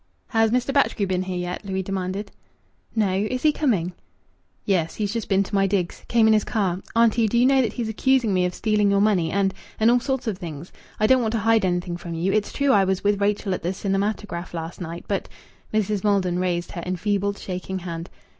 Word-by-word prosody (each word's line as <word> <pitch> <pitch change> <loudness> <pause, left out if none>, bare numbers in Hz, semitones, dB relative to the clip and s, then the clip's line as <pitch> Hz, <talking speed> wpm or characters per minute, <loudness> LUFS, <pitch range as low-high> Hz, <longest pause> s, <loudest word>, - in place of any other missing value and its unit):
"Has 225 -2 +3
Mr. 250 +3 0
Batchgrew 275 -7 +2
been 185 -1 0
here 185 -1 -3
yet?" 180 +2 -4
Louis 190 -1 -2
demanded. 195 +1 -3 0.6
"No. 205 -4 +2 0.2
Is 255 0 -3
he 305 - +5
coming?" 200 - 0 0.7
"Yes, 170 -5 0
he's 205 -1 -2
just 230 -3 -3
been 195 0 +3
to 195 - -11
my 195 -1 +3
digs. 185 -3 -2
Came 230 -2 +4
in 220 - +6
his 215 -1 +3
car. 190 -4 -1
Auntie, 230 -1 +4
do 235 - 0
you 245 - +5
know 270 0 +5
that 225 -4 -1
he's 235 -2 -3
accusing 240 0 +2
me 180 -1 +2
of 180 - -2
stealing 210 -2 +2
your 200 0 +3
money 200 -6 +2
and 195 +1 +1 0.3
and 220 +2 +5
all 245 - +4
sorts 265 0 -2
of 210 -5 -2
things! 165 -2 -7 0.3
I 215 - +3
don't 255 +3 +5
want 220 -1 -1
to - - +1
hide 225 0 +3
anything 175 -1 -1
from 170 -1 -6
you. 180 +4 0
It's 215 -1 0
true 280 -1 +2
I 200 -4 +5
was 190 -1 0
with 205 0 +1
Rachel 200 -1 +1
at - - -3
the 175 +3 -1
cinematograph 195 -2 -2
last 165 +2 -6
night, 170 0 -6
but 200 -2 -2 0.2
" - - -32
Mrs. 210 -2 0
Maldon 190 -4 +1
raised 175 -1 -1
her 170 - -5
enfeebled, 200 +2 -1
shaking 185 0 -5
hand. 170 -1 -6
200 Hz, 225 wpm, -23 LUFS, 180-220 Hz, 0.7 s, in